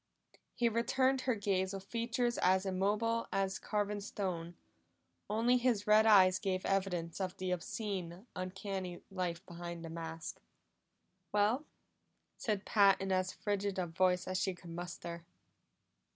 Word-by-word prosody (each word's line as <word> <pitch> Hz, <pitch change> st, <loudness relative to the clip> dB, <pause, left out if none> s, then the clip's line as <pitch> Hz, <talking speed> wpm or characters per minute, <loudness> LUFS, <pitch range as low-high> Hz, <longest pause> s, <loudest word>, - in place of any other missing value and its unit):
He 240 Hz, -, +2 dB
returned 260 Hz, +3 st, +2 dB
her 255 Hz, -2 st, +1 dB
gaze 195 Hz, -2 st, 0 dB
with 195 Hz, -, -6 dB
features 240 Hz, +3 st, -1 dB
as 185 Hz, +1 st, +3 dB
immobile 210 Hz, +5 st, +1 dB
as 195 Hz, -1 st, 0 dB
carven 205 Hz, -1 st, -1 dB
stone; 175 Hz, -4 st, -4 dB, 0.7 s
only 230 Hz, +4 st, +3 dB
his 240 Hz, -5 st, +1 dB
red 215 Hz, +1 st, +6 dB
eyes 185 Hz, -3 st, +7 dB
gave 185 Hz, -1 st, -1 dB
evidence 185 Hz, -3 st, -1 dB
of 185 Hz, -1 st, -3 dB
the 185 Hz, 0 st, -2 dB
obscene, 185 Hz, 0 st, -3 dB
uncanny 185 Hz, -1 st, -4 dB
life 180 Hz, -1 st, -3 dB
behind 170 Hz, -1 st, -7 dB
the 165 Hz, -, -7 dB
mask. 165 Hz, 0 st, -6 dB, 0.9 s
"Well?" 215 Hz, +8 st, +2 dB, 0.7 s
said 210 Hz, -3 st, -1 dB
Pat 200 Hz, -3 st, +5 dB
in 195 Hz, 0 st, -2 dB
as 185 Hz, 0 st, +1 dB
frigid 205 Hz, -1 st, -2 dB
a 185 Hz, -, +1 dB
voice 180 Hz, +2 st, +1 dB
as 185 Hz, 0 st, 0 dB
she 190 Hz, -2 st, 0 dB
could 175 Hz, -1 st, -11 dB
muster. 170 Hz, 0 st, -6 dB
195 Hz, 135 wpm, -34 LUFS, 180-210 Hz, 0.9 s, eyes